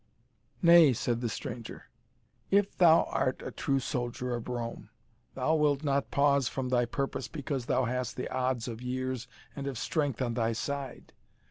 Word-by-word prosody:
"Nay," 170 -5 +8
said 120 +1 -1
the 120 - -1
stranger, 115 +1 -7 0.6
"if 200 0 +2
thou 170 -2 +6
art 130 -1 0
a - - -5
true 135 -1 0
soldier 125 0 -3
of 120 -1 -4
Rome, 120 -1 -5 0.5
thou 160 - +1
wilt 150 -2 +2
not 140 -1 0
pause 140 -2 +3
from 130 -1 -3
thy 120 -1 +2
purpose 135 +3 -3
because 140 -5 -4
thou 130 0 +2
hast 125 0 -2
the 125 - -3
odds 130 -2 -1
of 115 -1 -6
years 130 -1 -3 0.3
and 140 -1 -5
of 135 -3 -3
strength 145 0 -1
on 120 -3 -1
thy 115 -1 0
side. 140 +3 -5
130 Hz, 165 wpm, -30 LUFS, 120-140 Hz, 0.6 s, Nay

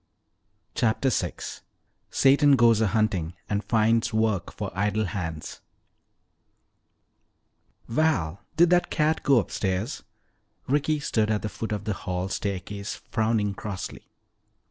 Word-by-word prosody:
CHAPTER 120 +3 +1
VI - - 0 0.8
SATAN 140 +1 +5
GOES 115 -3 +5
A 110 - +3
HUNTING 95 -6 0
AND 105 0 -1
FINDS 115 +2 +2
WORK 110 -3 0
FOR - - -5
IDLE 105 +2 +1
HANDS 80 -6 -5 2.3
"Val, 115 - +1 0.2
did 170 +1 +5
that 180 0 +3
cat 155 +1 +1
go 140 -2 +4
upstairs?" 100 +2 -1 0.7
Ricky 145 +2 +1
stood 110 -6 0
at 105 -1 0
the 105 - -2
foot 115 - -5
of 105 -2 -2
the 105 - -1
hall 90 -1 -3
staircase 100 +1 -4 0.2
frowning 110 -2 +1
crossly. 100 -2 -7
110 Hz, 120 wpm, -26 LUFS, 100-120 Hz, 2.3 s, SATAN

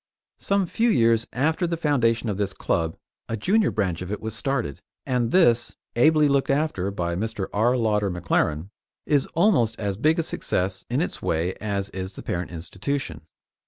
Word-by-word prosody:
Some 200 -1 +1
few 230 +7 +1
years 115 - +3
after 160 +7 +1
the 170 0 -2
foundation 120 -7 +1
of 105 -3 -1
this 100 -2 -1
club, 80 -2 -1 0.3
a 115 - -2
junior 200 - +2
branch 95 -6 -1
of 90 +1 -5
it 105 - -3
was 110 -1 -5
started, 120 - -2 0.2
and 125 -3 0
this, 120 -8 +3 0.2
ably 150 +5 +5
looked 140 -1 +1
after 140 - 0
by 85 -3 -2
Mr. 105 0 -2
R. 120 +5 +3
Lauder 105 -3 +1
McLaren, 85 0 -1 0.3
is 145 -3 +2
almost 155 - +3
as 100 -2 -2
big 155 +8 +3
a 165 - +1
success 95 - -2
in 125 +5 +1
its 175 - -3
way 85 +3 0
as 100 -2 -2
is 95 0 -5
the - - -9
parent 90 0 -3
institution. 90 - -4
115 Hz, 175 wpm, -24 LUFS, 95-145 Hz, 0.3 s, ably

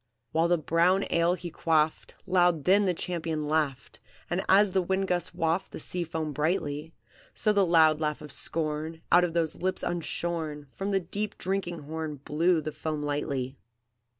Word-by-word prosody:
"While 165 +1 +2
the 175 0 +3
brown 170 +5 +2
ale 170 +1 +3
he 175 -2 -7
quaffed, 160 -1 0
Loud 175 -5 +3
then 200 +6 +4
the 185 - +2
champion 160 -3 -3
laughed, 150 -4 -1 0.3
And 175 +2 0
as 200 +1 +6
the 190 0 +2
wind 190 +2 0
gusts 180 -1 0
waft 170 +2 0
The - - -6
sea 180 -1 -3
foam 160 -2 -3
brightly, 150 0 -1 0.4
So 215 - +2
the 200 -1 +4
loud 160 -2 +5
laugh 150 -1 -1
of 150 -2 -10
scorn, 155 +2 -2
Out 175 +1 +7
of 175 -2 0
those 165 -2 +1
lips 185 +1 -2
unshorn, 165 -3 -3
From 195 +1 -4
the 195 -1 +2
deep 200 +4 -4
drinking 185 -2 -2
horn 155 0 -4
Blew 160 +5 +1
the 155 +1 -4
foam 150 0 -4
lightly. 140 -3 -2
165 Hz, 175 wpm, -28 LUFS, 155-180 Hz, 0.4 s, Out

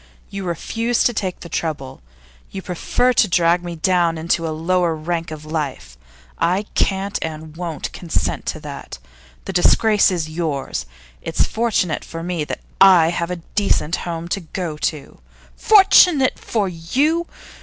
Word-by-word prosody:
You 195 -1 -5
refuse 230 +7 -1
to 240 - +2
take 190 -4 -3
the - - -8
trouble; 150 - -4 0.5
you 190 -1 -7
prefer 245 +8 0
to 220 - +4
drag 175 -1 +2
me 175 -1 -5
down 170 0 +1
into 165 +1 0
a - - -2
lower 165 +2 0
rank 165 +1 -3
of 155 -1 -8
life. 140 - -4 0.4
I 185 +4 +1
can't 195 +1 0
and 155 -1 -6
won't 170 -3 -5
consent 170 -3 -2
to - - -3
that. - - -8 0.5
The 195 - -5
disgrace 210 +4 +4
is 175 -4 -2
yours; 155 - -3 0.3
it's 165 - 0
fortunate 220 -8 0
for 165 0 -7
me 175 -3 -2
that - - -5 0.2
I 180 -4 +7
have 170 0 -2
a 180 -2 -5
decent 195 -5 +1
home 170 -1 -5
to 195 - -1
go 170 -2 -5
to.' 150 -1 -4 0.4
'Fortunate 360 -9 +5
for 210 -4 -1
you! 275 - 0
175 Hz, 155 wpm, -20 LUFS, 160-195 Hz, 0.5 s, I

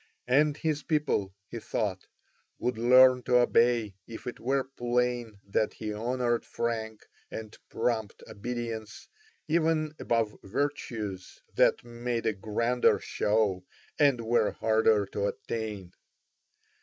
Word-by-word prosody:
And 145 +4 +3
his 155 -2 -1
people, 150 -12 0 0.2
he 115 - -6
thought, 100 -4 -3 0.5
would 125 - -1
learn 125 +1 +7
to 125 0 +3
obey 120 -3 +3
if 115 - -9
it 125 - -6
were 135 +4 +1
plain 120 -3 -1
that 100 +2 0
he 105 -1 -5
honoured 120 +2 0
frank 110 -2 -3 0.2
and 110 -1 -7
prompt 110 -4 -2
obedience 115 -1 -5 0.4
even 160 -1 +1
above 115 -3 0
virtues 110 -6 -4
that - - +3
made 120 0 -3
a 110 - +2
grander 115 +5 +2
show 105 -3 0 0.4
and 140 -5 +4
were 115 -1 +2
harder 110 -1 +3
to 100 +1 -2
attain. 105 -5 -5
115 Hz, 120 wpm, -29 LUFS, 110-125 Hz, 0.5 s, learn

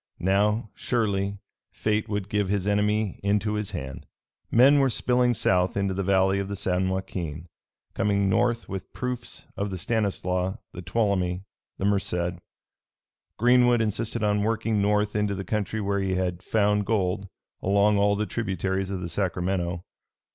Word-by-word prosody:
Now, 105 +4 +1
surely, 100 -4 -1 0.3
fate 105 -1 -1
would 100 -2 -2
give 105 -2 0
his 100 -2 0
enemy 105 0 +1
into 105 +1 +1
his 105 -1 -2
hand. 65 -9 -6 0.4
Men 135 +5 +6
were 135 -1 +4
spilling 125 +1 +2
south 90 -1 +2
into 100 -1 0
the 95 - -2
valley 95 0 +3
of 100 - -2
the 100 - -4
San 95 0 0
Joaquin, 85 -4 -4 0.5
coming 100 -1 +1
north 115 +4 +1
with 95 -2 -6
proofs 125 -2 -5
of 100 +1 -2
the 95 - -4
Stanislaus, 95 -2 -1 0.2
the 90 - -7
Tuolumne, 95 -1 0 0.3
the 95 - -2
Merced. 90 -3 0 1.0
Greenwood 120 +1 +5
insisted 110 +1 -1
on 105 0 +2
working 110 0 0
north 105 +1 +1
into 105 -1 +1
the 95 0 -5
country 105 0 -2
where 100 -1 0
he 95 -1 0
had 90 -1 -1
found 105 0 +1
gold, 100 -2 0 0.3
along 100 +1 +3
all 100 0 +3
the 105 +1 -1
tributaries 95 -3 -2
of 95 -2 -3
the 85 - -3
Sacramento. 90 -1 -2
100 Hz, 155 wpm, -26 LUFS, 95-105 Hz, 1.0 s, Men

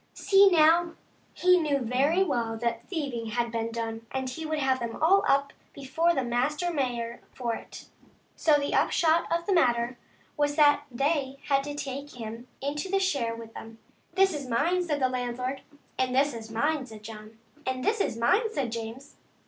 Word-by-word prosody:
See, 395 0 +5
now, 335 0 +4 0.4
he 360 0 +4
knew 300 -4 +1
very 275 +8 +2
well 235 -9 -1
that 235 0 -3
thieving 275 -10 -3
had 235 +1 -1
been 230 0 -2
done, 225 0 -5
and 265 0 -3
he 310 +5 -5
would 310 0 -1
have 265 -2 +1
them 235 -1 -4
all 380 +5 +4
up 280 0 +2 0.2
before 325 +5 0
the 270 - 0
master 290 +9 0
mayor 240 -5 -2
for 240 -3 -2
it. - - -9 0.5
So 310 - +3
the 285 -1 -1
upshot 330 0 +2
of 335 0 0
the 395 - +1
matter 240 -6 +2 0.4
was 290 -1 0
that 290 -1 +4
they 275 +1 -1
had 275 -1 +3
to 290 0 -5
take 280 0 -6
him 230 +2 -7
in 280 +1 -2
to 385 +5 0
share 275 -12 0
with 230 -1 -10
them. 225 0 -10 0.2
" - - -39
This 385 -1 +4
is 285 -3 -5
mine," 320 +10 +1
says 310 -5 -1
the 260 - +3
landlord. 255 +1 -3 0.2
" - - -27
And 255 -1 +1
this 280 +2 +3
is 225 -1 -8
mine," 290 +6 0
says 220 -2 -11
John. 215 0 -10
" 300 0 -28
And 260 0 -2
this 430 0 +2
is 230 - -1
mine," 395 - +2
says 265 - -2
James. 230 +5 -7
270 Hz, 195 wpm, -27 LUFS, 235-315 Hz, 0.5 s, See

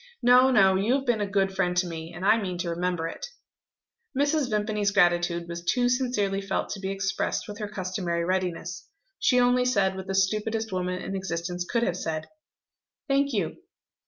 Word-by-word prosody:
No, 250 +2 +6
no; 195 -6 +5
you 215 +7 +2
have 275 -1 -2
been 240 -4 +1
a 205 - 0
good 195 -1 +1
friend 180 -1 0
to 180 - +3
me 165 -1 -6
and 175 +2 -6
I 220 +2 +5
mean 185 -3 -3
to 175 -1 -2
remember 175 -1 -1
it." - - -6 0.9
Mrs. 290 -1 +2
Vimpany's 210 -1 0
gratitude 175 -3 +2
was 170 0 -6
too 245 +7 +2
sincerely 245 -6 0
felt 195 - -2
to 200 - -5
be 190 0 -3
expressed 195 0 -2
with 205 -1 -8
her 210 - -3
customary 185 -4 -2
readiness. 180 -1 -2 0.3
She 250 - +3
only 245 0 +4
said 200 -7 +2
what 190 0 -7
the 195 - -2
stupidest 215 +3 0
woman 180 0 -2
in 195 - -4
existence 175 -1 -3
could 235 -1 +1
have 180 -5 0
said: 155 -3 -3 0.8
"Thank 280 +1 +2
you." 200 -9 -2
195 Hz, 190 wpm, -26 LUFS, 180-225 Hz, 0.9 s, No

